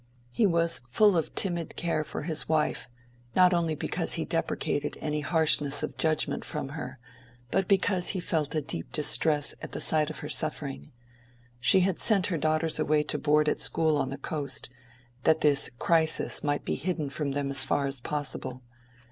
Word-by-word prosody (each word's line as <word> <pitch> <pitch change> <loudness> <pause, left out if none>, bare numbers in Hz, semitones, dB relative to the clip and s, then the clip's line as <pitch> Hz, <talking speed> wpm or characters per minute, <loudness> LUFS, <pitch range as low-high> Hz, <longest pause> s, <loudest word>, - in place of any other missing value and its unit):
He 215 - +2
was 170 -7 +1
full 205 - +4
of 165 - -2
timid 175 -4 -1
care 165 -3 -1
for - - -6
his 160 -1 +1
wife, 155 -1 0 0.5
not 180 0 +5
only 165 -2 0
because - - 0
he - - 0
deprecated - - -2
any 150 0 -2
harshness 150 -2 +2
of - - -4
judgment 155 -1 +1
from 150 -4 -5
her, 140 -3 -7 0.5
but 195 -1 0
because 190 -2 +1
he 190 - 0
felt 160 -4 -2
a 155 - +1
deep 85 - -4
distress 150 -1 +3
at - - -8
the - - -4
sight 155 -1 +2
of 155 - -7
her - - -4
suffering. 70 +1 -3 0.7
She 135 +10 +4
had 185 -1 0
sent 200 -5 +3
her - - 0
daughters 155 +1 0
away 155 -1 +2
to - - -1
board 150 0 +2
at - - +1
a - - -19
school 160 -1 +2
on 140 -2 -1
the 135 - -5
coast, 140 -3 -3 0.5
that 160 +2 +2
this 145 -2 +3
crisis 160 +1 +1
might 145 -1 -1
be - - -1
hidden 160 -5 -3
from 140 -1 -3
them 140 -1 -2
as 140 - +2
far 140 - 0
as 135 -2 -4
possible. 135 -3 -5
155 Hz, 185 wpm, -27 LUFS, 145-170 Hz, 0.7 s, not